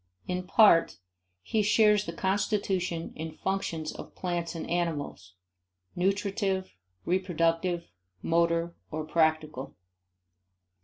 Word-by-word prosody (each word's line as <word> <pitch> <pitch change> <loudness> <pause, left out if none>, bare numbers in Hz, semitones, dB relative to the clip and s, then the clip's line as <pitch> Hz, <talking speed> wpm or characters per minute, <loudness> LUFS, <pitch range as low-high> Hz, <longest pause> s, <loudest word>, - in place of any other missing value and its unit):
In 180 0 -3
part, 195 -5 +5 0.5
he 215 - +1
shares 210 0 +4
the - - -2
constitution 190 -2 -1
and 160 0 -6
functions 170 -5 -2
of - - -10
plants 175 -2 -3
and 165 - -5
animals 155 - -3 0.6
nutritive, 195 +1 0 0.3
reproductive, 175 -1 +1 0.4
motor 170 0 +1
or 155 0 -4
practical. 155 -4 0
175 Hz, 95 wpm, -29 LUFS, 165-195 Hz, 0.6 s, part